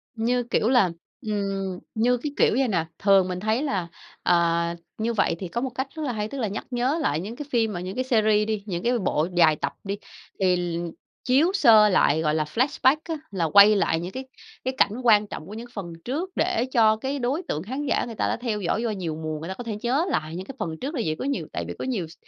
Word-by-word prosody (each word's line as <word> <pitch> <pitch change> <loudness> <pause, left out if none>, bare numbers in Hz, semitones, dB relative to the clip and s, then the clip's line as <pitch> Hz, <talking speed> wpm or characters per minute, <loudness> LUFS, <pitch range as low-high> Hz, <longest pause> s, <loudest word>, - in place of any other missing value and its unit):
Như 240 +2 +1
kiểu 230 -1 +1
là, 235 -9 +4 0.3
ừm, 195 -3 -2 0.2
như 245 +3 +3
cái 290 +4 -4
kiểu - - +4
vậy 265 - +2
nè, 170 -6 0
thường 195 -2 +4
mình 180 0 -3
thấy 220 +7 0
là, 190 - -1 0.4
à, 170 -1 +2 0.2
như 230 +2 -1
vậy 195 -5 +1
thì 185 - -4
có 235 +7 -3
một 265 - -1
cách 260 +2 -3
rất 315 - -4
là 255 - -1
hay, 210 -1 -2
tức 275 - -7
là 225 - 0
nhắc 205 +3 -5
nhớ 250 +6 +1
lại 150 - 0
những 210 +6 -6
cái 295 - -6
phim 225 -3 +1
mà 175 - -4
những 185 +2 -5
cái 255 - 0
series 215 -4 +2
đi, 215 -2 -2
những 180 -3 -4
cái 245 +1 +2
bộ 165 -4 0
dài 160 -3 +6
tập - - -3
đi 200 0 -3 0.4
thì 185 -2 +3
l 175 -1 -2 0.4
chiếu 285 +8 +4
sơ 220 - +6
lại 160 -5 +3
gọi 155 -1 +1
là 155 - +1
flashback 260 - +2
á 325 - 0 0.2
là 175 -4 0
quay 200 +5 +7
lại 165 -5 +1
những 175 +2 -5
cái 260 +5 -6 0.4
cái 260 - 0
cảnh 200 - +4
quan 210 -3 +5
trọng 155 - -7
của 205 - -9
những 230 +2 -7
phần 175 -5 -6
trước 315 +10 -2
để 355 -7 +1
cho 220 -2 +5
cái 270 +5 -3
đối 270 +9 -1
tượng 155 +3 -2
khán 265 +7 -4
giả - - +1
người 230 -2 -7
ta - - 0
đã - - -1
theo 225 -3 -3
dõi 190 +5 0
do 235 - 0
nhiều 175 -6 -3
mùa 155 -1 -4
người 160 - -7
ta - - -2
có 245 - -8
thể 225 -2 -4
nhớ 270 +8 +1
lại 155 - -2
những 185 +1 -5
cái 270 - -9
phần 160 -2 -3
trước 290 +4 -3
là 240 - 0
vậy. 155 0 0
Có - - -3
nhiều 280 0 -2
tại - - -3
vì - - -4
có - - -3
nhiều 210 -11 -2
s 160 - -14
215 Hz, 265 wpm, -25 LUFS, 180-250 Hz, 0.4 s, quay